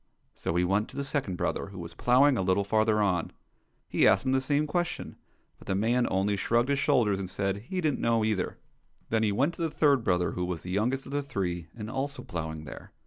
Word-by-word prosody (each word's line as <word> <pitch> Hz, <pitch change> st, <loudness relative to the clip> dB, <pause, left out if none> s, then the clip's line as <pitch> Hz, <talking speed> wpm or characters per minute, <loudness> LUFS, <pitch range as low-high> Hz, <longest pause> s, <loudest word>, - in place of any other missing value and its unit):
So -, -, -3 dB
he 90 Hz, -, +3 dB
went 100 Hz, +4 st, +1 dB
to -, -, -14 dB
the 140 Hz, -, -1 dB
second 135 Hz, -9 st, -2 dB
brother, -, -, -2 dB
who 100 Hz, 0 st, -11 dB
was 85 Hz, -1 st, -7 dB
ploughing 130 Hz, +3 st, +4 dB
a 115 Hz, -, 0 dB
little 95 Hz, +2 st, +2 dB
farther 110 Hz, +1 st, +2 dB
on. 90 Hz, -4 st, 0 dB, 0.6 s
He -, -, +3 dB
asked -, -, +4 dB
him 130 Hz, -, +1 dB
the 130 Hz, 0 st, +2 dB
same 145 Hz, +2 st, +1 dB
question, 175 Hz, +3 st, -2 dB, 0.4 s
but -, -, -16 dB
the 95 Hz, -, 0 dB
man 120 Hz, +5 st, +2 dB
only 100 Hz, +2 st, +1 dB
shrugged 120 Hz, +5 st, +1 dB
his 140 Hz, -1 st, +2 dB
shoulders 105 Hz, -8 st, +2 dB
and 95 Hz, -2 st, -4 dB
said 95 Hz, +1 st, -1 dB
he 185 Hz, -1 st, -1 dB
didn't 155 Hz, -5 st, 0 dB
know 115 Hz, -2 st, +2 dB
either. 105 Hz, -4 st, -1 dB, 0.5 s
Then 110 Hz, -1 st, +2 dB
he 110 Hz, -2 st, +2 dB
went 140 Hz, +11 st, +1 dB
to -, -, -8 dB
the 165 Hz, -, +1 dB
third 140 Hz, -5 st, +3 dB
brother, 90 Hz, -3 st, +1 dB
who 90 Hz, -, -2 dB
was 90 Hz, -2 st, -4 dB
the 90 Hz, -, -6 dB
youngest 120 Hz, +8 st, 0 dB
of -, -, -9 dB
the 145 Hz, +1 st, 0 dB
three, 90 Hz, -, -3 dB
and 105 Hz, -1 st, -5 dB
also 135 Hz, +4 st, -3 dB
ploughing 80 Hz, -2 st, -5 dB
there. -, -, -10 dB
110 Hz, 235 wpm, -28 LUFS, 95-135 Hz, 0.6 s, ploughing